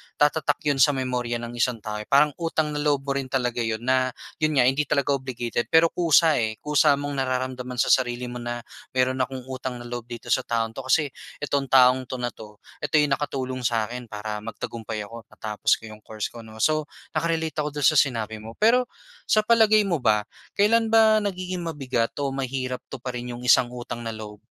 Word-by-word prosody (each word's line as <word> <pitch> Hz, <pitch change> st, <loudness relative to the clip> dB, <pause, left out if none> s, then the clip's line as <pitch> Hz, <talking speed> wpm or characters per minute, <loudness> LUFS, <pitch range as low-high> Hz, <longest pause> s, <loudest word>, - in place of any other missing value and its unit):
tatatak 145 Hz, 0 st, +1 dB
'yon 145 Hz, -2 st, +1 dB
sa 145 Hz, +3 st, +6 dB
memorya 125 Hz, -2 st, -2 dB
ng 120 Hz, 0 st, -6 dB
isang 120 Hz, -2 st, 0 dB
tao, 105 Hz, 0 st, -4 dB
eh, 105 Hz, -, -6 dB
parang 145 Hz, +2 st, +5 dB
utang 165 Hz, -2 st, -1 dB
na 150 Hz, -, -3 dB
loob 145 Hz, -2 st, +1 dB
mo 140 Hz, -, -2 dB
rin 135 Hz, -, -2 dB
talaga 125 Hz, -2 st, -1 dB
'yon 115 Hz, -1 st, -1 dB
na, 130 Hz, 0 st, +2 dB, 0.2 s
'yon 155 Hz, -1 st, +1 dB
nga 130 Hz, -, +5 dB
hindi 145 Hz, +3 st, 0 dB
talaga 140 Hz, -1 st, +1 dB
obligated 120 Hz, -3 st, -3 dB
pero 160 Hz, 0 st, +5 dB
kusa, 165 Hz, -2 st, +4 dB
eh, 110 Hz, -2 st, -1 dB
kusa 145 Hz, -1 st, +4 dB
mong 145 Hz, 0 st, -4 dB
nararamdaman 130 Hz, -1 st, -2 dB
sa -, -, +1 dB
sarili 125 Hz, -1 st, +1 dB
mo 125 Hz, -, -6 dB
na 120 Hz, 0 st, -4 dB, 0.3 s
mayro'n 130 Hz, 0 st, +1 dB
akong 130 Hz, -1 st, -8 dB
utang 130 Hz, -1 st, -4 dB
na -, -, -9 dB
loob 120 Hz, -1 st, -5 dB
dito 120 Hz, -1 st, -9 dB
sa 130 Hz, -, +2 dB
taong 115 Hz, -1 st, -1 dB
'to 135 Hz, -, -6 dB
kasi 145 Hz, +2 st, +2 dB, 0.3 s
itong 140 Hz, -1 st, 0 dB
taong 130 Hz, 0 st, +5 dB
'to 130 Hz, -, -5 dB
na 120 Hz, -, 0 dB
'to, 105 Hz, -3 st, -14 dB, 0.2 s
ito -, -, -1 dB
yung 145 Hz, -1 st, +1 dB
nakatulong 130 Hz, -3 st, -3 dB
sa'kin 120 Hz, +1 st, -1 dB
para 105 Hz, 0 st, -5 dB
magtagumpay 110 Hz, 0 st, -5 dB
ako, 115 Hz, +1 st, -10 dB
matapos 105 Hz, -1 st, -1 dB
ko -, -, -20 dB
yung 110 Hz, 0 st, -11 dB
course 110 Hz, -1 st, -4 dB
ko 120 Hz, -, -10 dB
'no. 110 Hz, 0 st, -10 dB
So, 155 Hz, -1 st, +2 dB, 0.3 s
naka-relate 160 Hz, 0 st, -1 dB
ako 150 Hz, -1 st, -2 dB
do'n 145 Hz, -, +3 dB
sa 155 Hz, -, +4 dB
sinabi 110 Hz, -5 st, 0 dB
mo, 110 Hz, +1 st, -9 dB
pero 245 Hz, +3 st, +5 dB, 0.4 s
sa 215 Hz, -, +4 dB
palagay 215 Hz, -1 st, +5 dB
mo 170 Hz, -, +2 dB
ba 110 Hz, -6 st, +2 dB, 0.3 s
kailan 225 Hz, +3 st, +3 dB
ba 220 Hz, -1 st, +6 dB
nagiging 185 Hz, -4 st, -3 dB
mabigat 135 Hz, -7 st, -1 dB
o 140 Hz, -, 0 dB
mahirap 130 Hz, -1 st, -3 dB
tuparin 125 Hz, -1 st, -5 dB
yung 120 Hz, -, -9 dB
isang 125 Hz, 0 st, +5 dB
utang 120 Hz, -1 st, -6 dB
na 115 Hz, -, -3 dB
loob? 105 Hz, -1 st, -9 dB
130 Hz, 205 wpm, -25 LUFS, 120-150 Hz, 0.4 s, sa